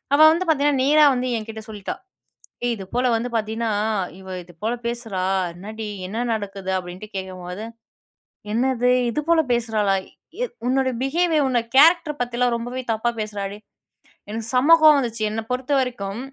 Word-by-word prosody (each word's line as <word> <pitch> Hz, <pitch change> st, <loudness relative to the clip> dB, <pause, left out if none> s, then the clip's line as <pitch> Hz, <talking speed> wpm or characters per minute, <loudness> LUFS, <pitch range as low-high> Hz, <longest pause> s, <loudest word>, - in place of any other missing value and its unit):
அவ -, -, +1 dB
வந்து 345 Hz, +2 st, 0 dB
பாத்தீங்கன்னா 285 Hz, -3 st, +2 dB
நேரா 300 Hz, +2 st, +6 dB
வந்து 255 Hz, 0 st, -1 dB
என்கிட்ட 220 Hz, 0 st, -7 dB
சொல்லிட்டா. 205 Hz, -3 st, -5 dB, 0.7 s
ஏய்! 240 Hz, -, +1 dB
இது 195 Hz, -3 st, -8 dB
போல 250 Hz, +1 st, +2 dB
வந்து 235 Hz, +2 st, -2 dB
பாத்தீன்னா 220 Hz, +1 st, -2 dB, 0.5 s
இவ 190 Hz, 0 st, -11 dB
இது 175 Hz, -, -17 dB
போல 225 Hz, +2 st, +1 dB
பேசுறா, 225 Hz, -6 st, -3 dB, 0.3 s
என்னடி? 215 Hz, +4 st, -7 dB, 0.2 s
என்ன 205 Hz, +4 st, -6 dB, 0.2 s
நடக்குது? 200 Hz, -3 st, -5 dB
அப்டின்ட்டு 180 Hz, +3 st, -9 dB
கேட்கும்போது, 185 Hz, +1 st, -6 dB, 0.9 s
என்னது! 250 Hz, +1 st, +2 dB, 0.2 s
இது 270 Hz, -, -1 dB
போல 335 Hz, -1 st, +5 dB
பேசுறாளா? 215 Hz, -4 st, +1 dB, 0.5 s
எ -, -, +1 dB, 0.2 s
உன்னோட 260 Hz, +1 st, +2 dB
பிஹேவியர் 315 Hz, +2 st, +2 dB
உன்னோட 240 Hz, -3 st, 0 dB
கேரக்டர் 315 Hz, 0 st, +5 dB
பத்திலாம் 245 Hz, 0 st, +1 dB
ரொம்பவே 245 Hz, +2 st, -4 dB
தப்பா 225 Hz, +2 st, 0 dB
பேசுறாடி, 205 Hz, -2 st, -4 dB, 0.7 s
"எனக்கு 220 Hz, +1 st, -4 dB
செம்ம 280 Hz, +6 st, +6 dB
கோவம் 305 Hz, -2 st, +8 dB
வந்துச்சு. 230 Hz, -4 st, -3 dB
என்ன 220 Hz, +1 st, -3 dB
பொறுத்தவரைக்கும், 250 Hz, -6 st, -1 dB
235 Hz, 145 wpm, -22 LUFS, 210-265 Hz, 0.9 s, கோவம்